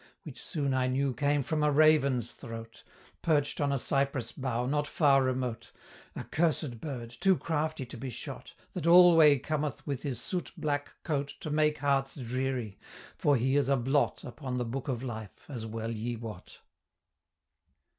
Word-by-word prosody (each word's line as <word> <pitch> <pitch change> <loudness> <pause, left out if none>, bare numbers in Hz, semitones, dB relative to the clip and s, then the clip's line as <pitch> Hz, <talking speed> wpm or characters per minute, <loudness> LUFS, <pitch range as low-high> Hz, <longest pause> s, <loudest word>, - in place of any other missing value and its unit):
Which 145 -5 -9
soon 140 -5 -1
I 130 -1 +2
knew 135 +1 0
came 145 +1 +1
from 155 +3 -1
a 150 - +4
raven's 140 -5 +4
throat, 115 -1 -9 0.4
Perch'd 145 -2 +1
on 140 -1 +2
a 140 - +1
cypress 135 -2 -1
bough 125 -2 -2
not 145 +3 0
far 140 -4 +4
remote, 125 -2 -2 0.4
A - - -4
cursed 150 -6 0
bird, 125 -7 -5
too 190 0 +4
crafty 155 -1 -2
to 120 - -10
be 130 +3 -5
shot, 120 - -8 0.2
That 170 -3 -3
alway 170 -4 +8
cometh 150 +2 -3
with 140 -3 -3
his 135 -6 -3
soot 180 +7 -4
black 145 -1 -2
coat 145 -3 -2
To 155 -5 -4
make 150 0 +2
hearts 135 -1 +1
dreary: 125 -4 -3 0.4
for 145 - +3
he 130 +2 +1
is 145 -1 +2
a 140 - +4
blot 135 +4 +1
Upon 130 0 -5
the 125 - -1
book 130 +4 -4
of 130 -2 -2
life, 110 -5 -7
as 120 -6 -6
well 115 +1 -4
ye 115 +2 -3
wot! 110 -5 -9
135 Hz, 170 wpm, -30 LUFS, 125-150 Hz, 0.4 s, alway